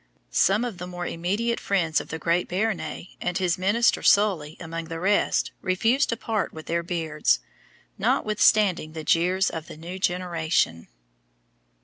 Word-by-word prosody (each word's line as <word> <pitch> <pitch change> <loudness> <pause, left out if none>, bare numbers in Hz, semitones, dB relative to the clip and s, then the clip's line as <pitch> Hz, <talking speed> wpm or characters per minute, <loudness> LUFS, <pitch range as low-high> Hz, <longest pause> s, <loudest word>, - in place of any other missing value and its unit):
Some 195 - +3
of 220 -7 -6
the 180 - -5
more 175 -1 -5
immediate 205 +9 -1
friends 165 -5 +1
of - - -11
the 160 - -5
great 170 +2 0
Béarnais, 195 -1 -2
and 180 0 -1
his 180 -2 0
minister 210 +5 +2
Sully 180 -7 +3
among 165 -1 -5
the 165 0 -6
rest, 200 +4 +1
refused 225 +9 +2
to 230 - -1
part 220 -3 -2
with 160 -1 -10
their 170 +1 -1
beards, 165 -3 0 0.6
notwithstanding 205 -6 +2
the 160 -1 -6
jeers 180 +5 +2
of 160 -1 -6
the - - -10
new 175 +4 -7
generation. 170 - 0
180 Hz, 150 wpm, -25 LUFS, 165-200 Hz, 0.6 s, Some